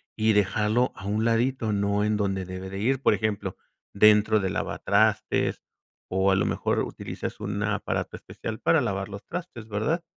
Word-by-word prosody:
y 110 0 +3
dejarlo 105 +4 +2
a 100 - -10
un 105 +2 0
ladito, 115 0 +1
¿no?, 100 0 +1
en 105 0 +1
donde 95 -2 -1
debe 95 +1 -7
de 95 - -6
ir. 130 +5 +1
Por - - +4
ejemplo, 110 -2 -2 0.4
dentro 105 +1 +5
del 95 -1 -1
lavatrastes. - - +1 0.5
O 95 +1 +3
a - - +4
lo 95 - +2
mejor - - 0
utilizas - - -5
un 100 0 -3
aparato 105 -1 -2
especial 110 0 -7
para 160 -4 +3
lavar 100 -4 -2
los 100 0 -8
trastes, 165 -11 -7
¿verdad? 150 - -1
105 Hz, 170 wpm, -26 LUFS, 100-110 Hz, 0.5 s, dentro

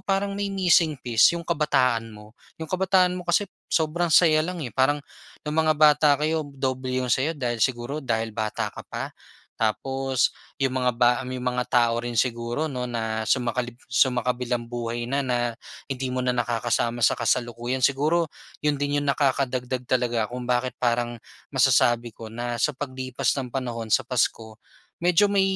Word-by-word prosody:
parang 200 0 -1
may 200 0 -2
missing 175 -5 +3
piece 120 +7 +3
'yong 170 - -6
kabataan 125 -8 +1
mo. 105 -1 -13 0.2
'Yong 160 -1 -7
kabataan 185 -1 +3
mo 180 - -6
kasi 175 +4 +3 0.2
sobrang 165 +2 +1
saya 155 -1 +5
lang 170 0 -3
eh. 120 - -6
Parang 145 +2 +1 0.4
no'ng 150 0 -3
mga 155 -1 +3
bata 150 0 +5
kayo 155 +2 0
doble 130 -1 -3
'yong 125 -3 0
saya 150 +4 +1
dahil 120 -4 -2
siguro 130 +5 0
dahil 115 -4 -2
bata 110 0 -3
ka - - -9
pa. - - -5 0.5
Tapos 130 +4 0 0.3
'yong 135 - +2
mga 125 -1 +1
ba 120 +1 +4 0.2
'yong 130 0 -5
mga 125 0 0
tao 120 -1 +2
rin 120 0 -4
siguro 120 +5 -1
'no 125 -2 -3
na 110 -2 -3
sumakalib 120 -1 0 0.2
sumakabilang-buhay 120 -1 0
na 140 - 0
na 125 -1 +1 0.5
hindi 130 -1 -2
mo 130 - -1
na 125 - +1
nakakasama 120 -1 -1
sa - - +3
kasalukuyan. 120 +1 -1
Siguro 150 +5 +2 0.3
'yon 150 -1 +1
din 145 0 0
'yong 145 - -3
nakakadagdag 130 -2 0
talaga 120 -3 +1
kung 125 0 -6
bakit 125 0 -1
parang 120 -1 0 0.3
masasabi 120 -1 +3
ko 110 -1 -9
na 120 +1 -4
sa 125 - +2
paglipas 130 -2 -2
ng 130 -3 -4
panahon 120 -3 -4
sa 120 +3 +3
Pasko, 115 -3 -1 0.4
medyo 180 +3 +4
may 200 -1 +2
125 Hz, 165 wpm, -25 LUFS, 120-150 Hz, 0.5 s, saya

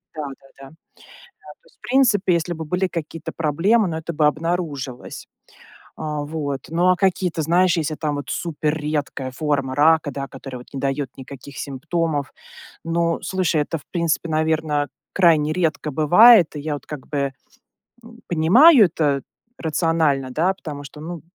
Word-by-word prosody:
да, 155 - -4 0.2
да, 135 - -21
да. 135 - -11 0.7
То 150 - -17
есть - - -26
в - - -63
принципе, 240 -8 +3
если 170 +1 -1
бы 160 0 -6
были 180 +4 -1
какие-то 165 -2 -6
проблемы, 180 +8 +2
ну, 160 - -3
это 160 +1 -5
бы 150 0 +3
обнаружилось. 150 -5 -3 0.7
O, 150 -1 -4
вот. 145 -3 -4
Ну 170 +3 +1
а 185 - +5
какие-то, 185 -3 0
знаешь, 175 +3 +3
если 155 -1 -1
там 150 -1 -2
вот 145 -2 -6
если - - -2
супер 155 -2 -2
редкая 145 -3 -3
форма 140 -2 -1
рака, 155 +1 +4
да, 140 -1 -5
которая 135 -1 -9
вот - - -16
не 135 - -4
дает 135 0 -2
никаких 135 +1 -11
симптомов. 145 +1 -2 0.5
Но, 170 0 0
слушай, 185 -4 0
это 165 - -3
в - - -19
принципе, 170 -1 -1
наверно, 155 -2 0 0.3
крайне 160 -5 +4
редко 160 -3 -1
бывает. 175 - +6
И 145 - -5
я 150 0 -3
вот 145 - -10
как 150 -4 -8
бы, 140 -2 -2 0.7
м, 235 +1 -14
понимаю 215 - +6
это 150 -5 0 0.3
рационально, 160 -4 0
да, 175 +7 +1
потому 150 -6 -8
что, 150 +2 -11
ну, 170 0 -7
155 Hz, 165 wpm, -21 LUFS, 145-170 Hz, 0.7 s, бывает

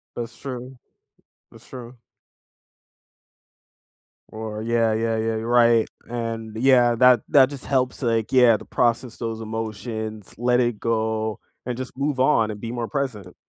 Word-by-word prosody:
That's 120 -1 -6
true, 130 -1 -7 0.7
that's 115 +1 -16
true. 125 -1 -10 2.3
Or 110 -1 -6
yeah 115 0 +1
yeah 115 0 0
yeah, 110 0 -1
you're 110 +1 -4
right, 120 -1 +4 0.2
and, 115 -2 -4
yeah 120 -1 +4
that 125 -1 +5
that 135 -2 +6
just 140 -3 -9
helps, 130 -1 0
like, 115 -3 0
yeah 125 -3 +6
to - - -12
process 120 0 0
those 115 -1 -4
emotions, 110 -1 -5
let 125 +1 +2
it 120 -3 -1
go, 110 -1 -1 0.3
and 125 -1 -3
just 130 0 -7
move 140 -1 -1
on, 130 -5 +3
and 105 - -8
be 115 - -5
more 120 -1 -3
present. 115 -11 -4
115 Hz, 145 wpm, -23 LUFS, 110-125 Hz, 2.3 s, that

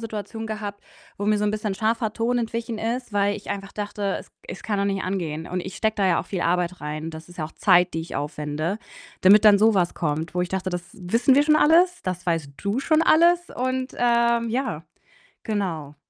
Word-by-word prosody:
Situationen 220 0 -6
gehabt, 210 -2 -6 0.3
wo 205 - -3
mir 215 0 +3
so 210 - 0
'n 210 - +2
bisschen 210 -2 -2
scharfer 220 +1 0
Ton 240 +2 0
entwichen 230 0 -3
ist, 235 0 -3
weil 205 0 +1
ich 205 - -9
einfach 195 -1 -5
dachte, 205 -1 -3
es - - -16 0.2
es - - -8
kann 205 -2 -2
doch 200 - +1
nicht 195 -1 -1
angehen. 165 -4 -3
Und 180 0 -2
ich 190 +1 -7
stecke 220 0 0
da 195 -2 +2
ja 170 -2 +3
auch - - -10
viel 185 -3 -3
Arbeit 180 +1 0
rein. 155 +2 -5
Das 160 +1 -10
ist 175 - -15
ja 155 - -1
auch 155 - -9
Zeit, 180 -3 +3
die 165 - -1
ich 165 - -8
aufwende, 150 +6 -3 0.4
damit 205 +3 +7
dann 205 -1 +7
so 220 +1 +4
was 175 -2 +1
kommt, 160 +1 -2
wo 180 - 0
ich 180 - -3
dachte: 190 0 -2
„Das 180 -1 -3
wissen 230 +6 +2
wir 285 - +5
schon 305 0 +4
alles. 350 +4 +4
Das 185 -1 -4
weißt 165 -5 -1
du 200 +4 -2
schon 310 +3 +2
alles.“ 345 +2 +4
Und, 255 +1 -2
ähm, 235 -1 +2
ja, 230 - -2 0.6
genau. 170 - -3
205 Hz, 225 wpm, -24 LUFS, 175-230 Hz, 0.6 s, damit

